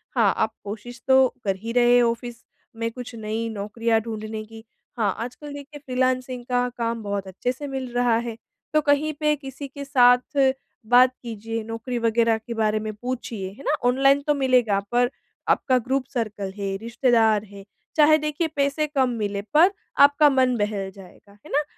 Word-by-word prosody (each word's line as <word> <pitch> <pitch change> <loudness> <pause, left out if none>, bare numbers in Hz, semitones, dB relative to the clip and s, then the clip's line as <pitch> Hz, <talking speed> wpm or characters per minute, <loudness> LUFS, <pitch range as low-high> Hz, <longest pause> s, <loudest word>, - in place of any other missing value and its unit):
हाँ, - - +4
आप 220 - 0
कोशिश 230 +4 -8
तो 265 0 +6 0.2
कर 195 -2 0
ही 225 +4 -6
रहे 245 0 +5
ऑफ़िस 235 0 -2 0.3
में 230 0 -2
कुछ 250 +1 -8
नई 220 +1 -3
नौकरियाँ 220 +2 0
ढूँढने 215 -1 -5
की। 225 0 -13 0.3
हाँ, 205 -4 +1
आजकल 250 +5 -7
देखिए 285 +1 -9
फ्रीलांसिंग 255 -2 -1
का 250 0 +1
काम 230 -1 -2
बहुत 200 -1 -3
अच्छे 190 +6 -2
से 285 +3 -7
मिल 265 -2 -5
रहा 245 -2 +2
है। 235 -1 -4 0.4
तो 305 - +4
कहीं 295 +1 +2
पे 300 0 +2
किसी 275 0 -8
के 280 +1 -8
साथ 250 +1 +4 0.5
बात 250 +2 +5
कीजिए, 225 0 -5
नौकरी 230 +3 -5
वग़ैरह 230 0 +2
के 235 +2 -7
बारे 215 -1 +1
में 215 0 -4
पूछिए, 230 -4 -5
है 230 +8 -14
ना। 300 - +1 0.2
ऑनलाइन 275 +2 +4
तो 295 - +4
मिलेगा, 250 -7 +2
पर 245 0 +3 0.4
आपका 260 -2 +3
ग्रुप 255 +2 -1
सर्कल 210 -5 -3
है, 195 -1 -2
रिश्तेदार 225 -1 +2
है, 200 -1 -12 0.3
चाहे 310 0 +6
देखिए 305 +2 -1
पैसे 280 +2 +1
कम 270 -4 +1
मिले 205 -4 -2
पर 340 +6 +6 0.3
आपका 285 +1 +7
मन 255 -2 +2
बहल 205 -2 -2
जाएगा, 195 +1 -16
है - - -12
ना। 295 +2 +2
240 Hz, 175 wpm, -24 LUFS, 220-265 Hz, 0.5 s, आपका